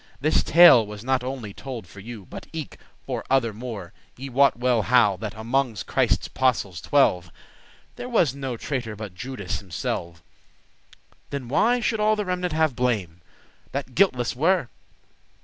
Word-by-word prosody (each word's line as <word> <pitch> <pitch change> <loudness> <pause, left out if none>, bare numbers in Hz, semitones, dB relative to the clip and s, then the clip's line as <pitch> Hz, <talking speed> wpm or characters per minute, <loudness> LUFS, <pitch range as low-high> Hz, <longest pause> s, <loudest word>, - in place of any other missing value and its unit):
This 155 +3 +2
tale 165 -8 +8
was 105 0 -9
not 130 0 0
only 125 -6 -5
told 125 -4 -7
for 95 +3 -14
you, 110 -1 -9
But - - -10
eke 160 -3 -6 0.3
for - - -4
other 125 -5 +2
more; 110 -6 -7 0.2
ye 135 +2 -7
wot 135 +1 +3
well 120 -2 +2
how 105 -3 +4
That 105 +1 -6
amonges 115 0 -1
Christe's - - +1
apostles 105 -9 0
twelve 90 - +2 0.7
There 245 - -6
was 175 - +2
no 135 -3 -5
traitor 120 -4 -4
but 105 -3 -8
Judas 100 -1 -5
himselve; 85 -2 -5 1.1
Then 135 -4 -5
why 240 - +2
should 220 -1 0
all 215 +1 +3
the 210 -1 -2
remenant 180 -2 -2
have 155 -4 +1
blame, 100 -10 -1 0.5
That 135 -1 -4
guiltless 125 -12 +2
were? 165 0 +2
125 Hz, 155 wpm, -24 LUFS, 105-140 Hz, 1.1 s, tale